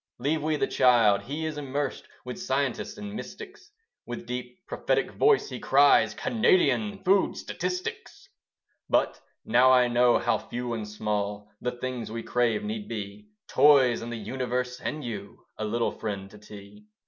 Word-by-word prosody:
Leave 145 +5 0
we 155 +1 0
the - - +1
child: 115 -5 +4
he 150 +5 -4
is 155 -1 -3
immersed 140 0 -3 0.2
With 125 +9 -6
scientists 140 - -2
and 205 -1 -7
mystics: 390 - -9 0.4
With 120 0 -6
deep 125 +9 -7
prophetic - - -1
voice 430 -1 +3
he 125 -2 -6
cries 135 -6 +4
Canadian 210 -3 +2
food 195 +1 +3
statistics. 180 0 -5 0.6
But - - +1 0.2
now 125 +3 +5
I 125 -1 +5
know 120 0 +4
how - - +1
few 120 0 -5
and 110 -2 -4
small, 105 -1 -3
The 125 0 -2
things 125 -2 -5
we 115 0 -5
crave 120 - +1
need 210 0 -4
be 105 -1 -7 0.2
Toys 135 -6 +5
and 120 +1 -6
the 120 - -4
universe 125 +1 -3
and 150 -1 -4
you 105 -4 -7
A 110 - -1
little 115 +2 0
friend 100 -2 -5
to 105 - -13
tea. 105 0 -13
125 Hz, 160 wpm, -27 LUFS, 110-155 Hz, 0.6 s, now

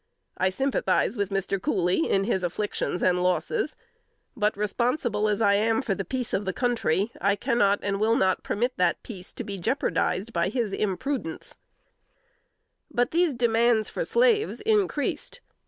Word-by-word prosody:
_ - - -51 0.3
I 185 - +2
sympathize 225 -2 0
with 200 -3 -1
Mr. 195 -1 -1
Cooley 175 -3 +1
in 195 - +2
his 195 -3 0
afflictions 180 0 -2
and 180 -1 +3
losses; 295 - 0 0.6
but 210 -4 0
responsible 215 0 0
as 210 +1 0
I 200 - +5
am 225 +5 +2
for 210 - 0
the 195 - -3
peace 250 +4 -4
of 200 - 0
the 190 -2 -2
country, 225 -5 0
I 200 +2 +3
cannot 205 -4 +2
and 200 -1 -1
will 220 +2 +3
not 190 -1 +2
permit 245 +4 -1
that 180 -1 +1
peace 190 -6 -9
to - - -6
be 200 -1 -6
jeopardized 200 -1 -1
by - - +1
his 230 -6 -2
imprudence." 215 - -3 1.3
But 245 0 0
these 335 -4 +2
demands 235 -2 +2
for - - -3
slaves 470 -3 +2
increased. 420 0 0
210 Hz, 160 wpm, -26 LUFS, 195-250 Hz, 1.3 s, I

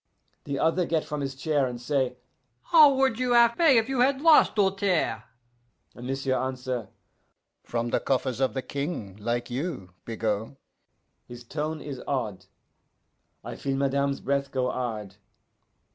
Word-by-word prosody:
The 140 -1 -3
other 165 +4 +1
get 160 -2 0
from 150 -1 -4
his 135 -1 -4
chair, 140 0 0
and 120 -1 -6
say, 130 0 -1 0.5
'How 310 -4 +7
would 265 -3 +1
you 250 -1 +1
have 235 -1 +5
pay 320 -7 +5
if 225 0 +2
you 265 -2 -2
had 265 +2 +3
lost, 315 +1 +5
Doltaire?' 195 - +1 0.7
And 120 +1 -9
m'sieu' 135 0 -1
answer, 130 -3 -3 0.8
'From 120 0 -2
the - - +2
coffers 130 -2 -1
of 130 -4 0
the 130 - -2
King, 140 - -4
like 120 +3 -3
you, 130 - -4
Bigot' 110 +2 -3 0.7
His 120 0 -10
tone 155 +5 -4
is 140 -4 -7
odd. 110 -9 -3 1.0
I - - -6
feel 135 -1 -2
madame's 140 0 0
breath 140 0 -1
go 125 -1 -1
hard. 110 -6 -4
135 Hz, 150 wpm, -26 LUFS, 120-170 Hz, 1.0 s, How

